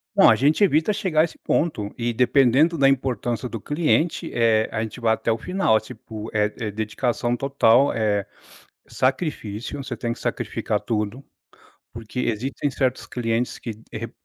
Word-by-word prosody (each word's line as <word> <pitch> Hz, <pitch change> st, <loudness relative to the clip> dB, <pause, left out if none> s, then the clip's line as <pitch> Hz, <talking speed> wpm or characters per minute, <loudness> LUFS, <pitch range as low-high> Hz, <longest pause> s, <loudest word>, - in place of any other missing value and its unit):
Bom, -, -, +7 dB
a -, -, +6 dB
gente 150 Hz, +9 st, +3 dB
evita 160 Hz, +1 st, +3 dB
chegar 190 Hz, -7 st, +1 dB
a -, -, +5 dB
esse 170 Hz, -, -4 dB
ponto. 110 Hz, -11 st, -1 dB
E, 120 Hz, 0 st, -1 dB
dependendo 135 Hz, +6 st, +3 dB
da 135 Hz, -1 st, +5 dB
importância 125 Hz, -3 st, -1 dB
do 115 Hz, -3 st, -6 dB
cliente, 160 Hz, +2 st, 0 dB
eh, 115 Hz, -2 st, +3 dB
a 110 Hz, -, -2 dB
gente 115 Hz, +3 st, -5 dB
vai 115 Hz, -1 st, +2 dB
até 115 Hz, -, -1 dB
o 110 Hz, -, 0 dB
final. 180 Hz, -, +1 dB
Tipo, 110 Hz, 0 st, -9 dB
é 105 Hz, -1 st, +3 dB
é 110 Hz, -2 st, -3 dB
dedicação 120 Hz, +3 st, -1 dB
total, 135 Hz, -1 st, +3 dB
é, 105 Hz, -3 st, 0 dB, 0.6 s
sacrifício. 130 Hz, -, -2 dB
Você 120 Hz, -3 st, -5 dB
tem 115 Hz, 0 st, -2 dB
que -, -, -8 dB
sacrificar -, -, -2 dB
tudo, 110 Hz, +3 st, -3 dB, 0.7 s
porque, 115 Hz, +2 st, -7 dB
existem 125 Hz, +5 st, -1 dB
certos 130 Hz, -1 st, -1 dB
clientes 120 Hz, 0 st, -2 dB
que 115 Hz, -, -6 dB, 0.2 s
re -, -, -6 dB
120 Hz, 165 wpm, -23 LUFS, 110-140 Hz, 0.7 s, Bom